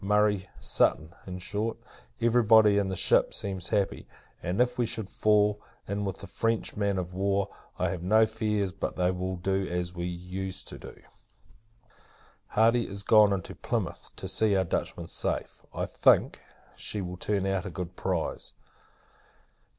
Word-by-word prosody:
Murray, 105 -1 +2
Sutton 80 +2 +1
in 90 0 -5
short, 105 +5 -2 0.4
every 120 +1 +3
body 105 -2 +6
in 100 -1 0
the 95 - -2
ship, - - +3
seems 95 -3 -3
happy; 100 -3 0 0.3
and, 90 +5 -2
if 125 0 +3
we 120 -2 0
should 110 -3 -3
fall 105 -1 +3 0.3
in 100 +1 -2
with 95 -2 -5
a - - -5
French 115 -1 -1
man 100 -2 0
of 90 -1 -4
war, 100 +1 0 0.3
I - - 0
have 90 - -4
no 110 +5 +5
fears 105 -3 -1
but - - -4
they 90 0 +2
will 95 0 -3
do 95 +1 -1
as 90 0 -3
we 85 -1 -4
used 90 +2 -5
to - - -9
do. - - -11 1.5
Hardy 115 +2 +3
is 100 +1 -4
gone 105 -1 +6
into 95 -3 -3
Plymouth, - - -3
to - - -6
see 110 -2 +2
our 95 - +3
Dutchman 85 - -3
safe. - - -2
I - - -2
think, - - +3 0.4
she 105 - -3
will 90 -2 -5
turn 100 0 -1
out 95 0 -1
a - - -4
good 90 0 -6
prize. 90 -4 -3
100 Hz, 165 wpm, -28 LUFS, 90-105 Hz, 1.5 s, body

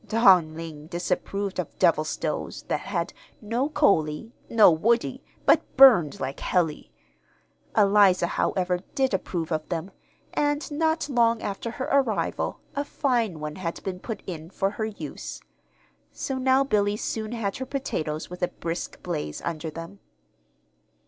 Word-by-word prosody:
Dong 185 -8 +5
Ling 160 -2 -8
disapproved 185 +3 -2
of - - -4
"devil - - +4
stoves" - - -3
that - - -1
had - - -3 0.3
"no 235 +6 -1
coalee, 200 - +2 0.2
no 220 -5 +7
woodee, 230 +8 +1 0.2
but - - +6 0.2
burned 230 - +7
like 130 +1 -3
hellee." 160 - 0 0.9
Eliza, 200 -3 +5
however, 180 +1 0 0.2
did 265 -4 +1
approve 175 -3 -2
of 155 -1 -2
them; 175 +2 -3 0.4
and 290 +1 0
not 320 +1 +1
long 235 -4 +2
after 200 +3 -3
her 255 +3 -4
arrival, 275 -1 0
a 285 - 0
fine 240 - 0
one 150 +2 -5
had 170 -3 -4
been 185 -2 -4
put 220 +1 -6
in 165 -3 -6
for 195 +1 -1
her 220 +1 -3
use. 215 -2 -7 0.7
So 265 -1 -3
now 260 +1 +4
Billy 210 -5 +1
soon 220 +1 -3
had 210 -4 -2
her 260 - -5
potatoes 160 - -3
with 180 +1 -9
a 180 - +3
brisk 165 0 -5
blaze 75 0 -3
under 160 -1 -3
them. 165 +5 -9
200 Hz, 145 wpm, -26 LUFS, 165-240 Hz, 0.9 s, no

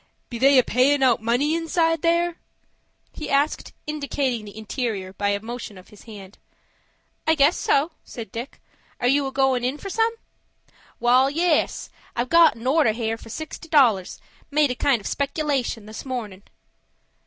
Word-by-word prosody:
"Be 235 - -5
they 275 +2 +5
a 255 - +6
payin' 265 +5 +2
out 240 -3 +3
money 245 +7 +1
inside 330 -1 +1
there?" 340 0 +1 0.8
he 305 -2 -7
asked, 285 +2 0
indicating 280 -6 -2
the 205 +1 -11
interior 220 -4 -4
by 200 +1 -1
a 200 0 0
motion 225 -2 -7
of 185 - -15
his 210 - -17
hand. 205 -3 -12 0.9
"I 320 - +4
guess 295 +3 +4
so," 290 +5 +1
said 225 -5 -9
Dick. 240 +4 -7 0.4
"Are 245 - +1
you 275 +2 +2
a - - -5
goin' 265 -2 +1
in 255 +4 -1
for 390 +5 -7
some?" 455 +2 +1 0.8
"Wal, 250 +3 +4
yes. 330 +2 0 0.2
I've 245 +1 -2
got 335 -4 +6
an 230 +1 -11
order 265 -4 +3
here 225 0 -2
for - - -13
sixty 315 +5 -8
dollars,—made 280 - +1
a - - -3
kind 250 -3 +1
of - - -16
speculation 280 -6 -2
this 215 +1 -8
morning." 225 -8 -5
260 Hz, 165 wpm, -23 LUFS, 225-300 Hz, 0.9 s, a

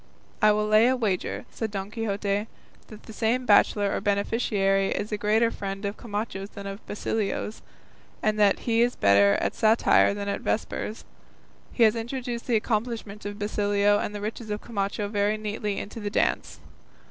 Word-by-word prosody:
"I 215 - +6
will 210 0 +1
lay 215 +2 +5
a 260 - +3
wager," 210 -7 -2
said 225 - -3
Don 200 0 -5
Quixote, 205 -1 -2 0.4
"that 215 -1 -12
the 220 - -11
same 240 +4 0
bachelor 205 -2 +4
or - - -2
beneficiary 200 -1 +1
is 210 - -3
a - - +1
greater 220 +3 +2
friend 195 -1 -5
of 200 +1 -2
Camacho's 205 -3 -5
than 200 -1 -9
of 195 +2 -7
Basilio's, 210 0 -3 0.6
and 215 0 +1
that 205 -2 +4
he 230 -1 +1
is 245 +1 +2
better 100 0 +5
at - - -1
satire 220 -2 +4
than 200 0 -4
at 200 - -2
vespers; 220 0 -3 0.7
he 240 - +2
has 220 0 +5
introduced 240 +1 -4
the 240 - +2
accomplishments 215 -2 -2
of 205 0 -6
Basilio 205 0 +2
and 210 - -3
the 205 - -5
riches 220 +1 -5
of 210 0 -2
Camacho 205 -2 -2
very 205 +1 0
neatly 210 -1 -3
into 215 - -6
the 205 -1 -3
dance." - - -1
210 Hz, 175 wpm, -26 LUFS, 200-225 Hz, 0.7 s, I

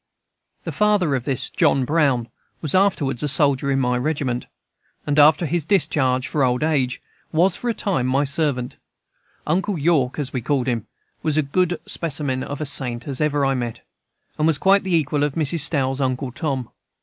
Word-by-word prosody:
The - - -4
father 205 -7 +2
of 130 -2 -2
this 135 -4 0
John 135 -2 +2
Brown 140 -6 +1 0.3
was 155 - -2
afterwards 165 -10 +1
a 150 - 0
soldier 140 -1 +3
in 135 0 +1
my 125 -1 +1
regiment; 130 -4 -2 0.6
and, 145 0 +1
after 150 +3 +5
his 165 +1 -1
discharge 145 -7 +1
for 145 - 0
old 125 +2 +1
age, 135 -5 0 0.3
was, 175 +3 +2
for 245 - -3
a - - +1
time, 170 -11 -1
my 135 +2 +2
servant. 140 -4 -1 0.7
"Uncle 185 +4 0
York," 145 -5 +1
as 145 -3 -3
we 125 - -2
called 130 +1 0
him, 120 -4 -2 0.3
was 155 -1 0
as 155 - +2
good 180 0 +2
a - - -6
specimen 145 -5 -2
of 145 +2 -5
a 155 - -3
saint 125 -3 0
as 135 -1 -4
I - - +4
have 150 -1 -2
ever 135 -2 +1
met, 120 -3 -4 0.6
and 155 - +3
was 160 -3 +2
quite 195 +5 +3
the 185 -2 0
equal 150 -2 0
of 145 -2 -1
Mrs. 160 0 +1
Stowe's 140 -3 +1
"Uncle 130 0 -2
Tom." 130 -4 -3
145 Hz, 195 wpm, -21 LUFS, 130-160 Hz, 0.7 s, after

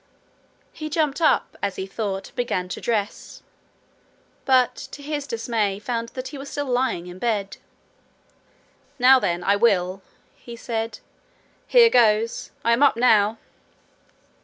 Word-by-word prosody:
He 310 -1 -6
jumped 305 0 -1
up, 315 - +1
as 195 - -2
he 190 - -4
thought, 195 -1 -4
and - - -27
began 210 -7 -2
to - - -6
dress, 215 -3 -3 1.0
but, 255 -2 +4
to 285 - -10
his 290 -1 -4
dismay, 225 -4 -1
found 230 +2 -4
that 255 0 -5
he 285 - -9
was 275 - -8
still 290 - -3
lying 250 -8 -1
in 180 +1 -10
bed. 210 -4 -2 1.4
'Now 260 +1 +6
then, 175 -5 -1
I 200 - +3
will!' 195 -4 +1 0.3
he 235 - -11
said. 225 -2 -4 0.7
'Here 470 -2 +6
goes! 225 -1 +2 0.2
I 235 - +4
am 235 - +1
up 285 -5 +4
now!' 220 -3 +3
230 Hz, 140 wpm, -23 LUFS, 200-260 Hz, 1.4 s, Now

